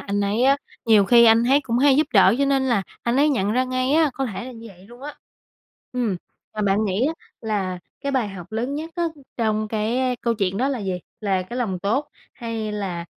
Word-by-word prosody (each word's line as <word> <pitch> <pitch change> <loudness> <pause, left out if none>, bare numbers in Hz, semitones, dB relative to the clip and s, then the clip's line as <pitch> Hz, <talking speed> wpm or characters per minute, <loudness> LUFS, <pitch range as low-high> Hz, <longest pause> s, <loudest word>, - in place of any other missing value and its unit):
anh 205 0 -2
ấy 205 +4 0
á, 275 +1 +5 0.3
nhiều 215 -3 +5
khi 235 +3 +6
anh 225 +1 +6
ấy 275 +4 +4
cũng 240 -3 -1
hay 275 0 +5
giúp 305 0 +3
đỡ 195 0 +6
cho 280 - +3
nên 275 -1 +2
là 225 -6 +2 0.2
anh 240 +2 0
ấy 295 +2 +4
nhận 210 -7 +1
ra 255 +2 +2
ngay 255 +1 -1
á 315 -2 +4
có 270 -1 -2
thể 225 +2 -5
là 255 - -8
như 230 0 -11
vậy 190 -1 -16
luôn 240 +4 -15
á. 295 +1 -7 0.8
Ừm, 235 -7 -1 0.4
mà 215 - -2
bạn 200 +2 +2
nghĩ 205 +7 +1
á 320 - 0 0.3
là 195 -5 -2 0.2
cái 280 0 -3
bài 245 -6 0
học 190 0 -10
lớn 245 +5 -2
nhất 320 +2 -5
á 345 - 0 0.3
trong 215 -2 0
cái 240 +4 0
câu 235 -1 0
chuyện 195 -2 -1
đó 260 +4 +1
là 270 -3 -2
gì? 195 -3 -3 0.3
Là 195 -3 0
cái 240 +7 -8
lòng 195 -7 -1
tốt, 225 +10 -1 0.2
hay 225 -3 -4
là, 185 -5 -4
230 Hz, 235 wpm, -22 LUFS, 205-260 Hz, 0.8 s, khi